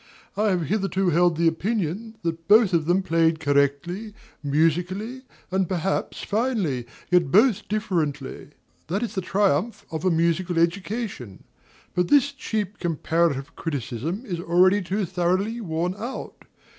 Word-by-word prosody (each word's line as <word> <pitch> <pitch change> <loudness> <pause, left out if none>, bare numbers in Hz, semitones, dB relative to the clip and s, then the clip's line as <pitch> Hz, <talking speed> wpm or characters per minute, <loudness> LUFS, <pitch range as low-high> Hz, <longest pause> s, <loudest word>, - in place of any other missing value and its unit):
I 215 +1 +2
have 180 -3 +1
hitherto 195 0 0
held 170 0 +3
the 170 0 +3
opinion 200 +4 -1
that 165 -1 -3
both 210 -2 +6
of 165 -2 +2
them 185 +2 +2
played 165 -2 +2
correctly, 145 +8 0 0.3
musically, 175 - 0 0.3
and 190 -2 +1
perhaps 185 +1 -2
finely, 215 - 0
and 120 - -7 0.3
yet 175 -6 +3
both 215 +1 +4
differently: 165 -10 -2 0.4
that 195 +8 -1
is 230 - -3
the 190 - -1
triumph 195 +2 0
of 160 -1 -4
a 185 - +3
musical 170 +1 +1
education. 170 - -2 0.5
But 180 -1 +1
this 285 +3 +4
cheap 215 -7 -4
comparative 160 -4 0
criticism 155 - -4
is 180 -7 -4
already 180 +4 +4
too 195 +2 -1
thoroughly 185 +6 0
worn 175 -1 -1
out. 235 +6 -7
180 Hz, 140 wpm, -24 LUFS, 165-205 Hz, 0.5 s, both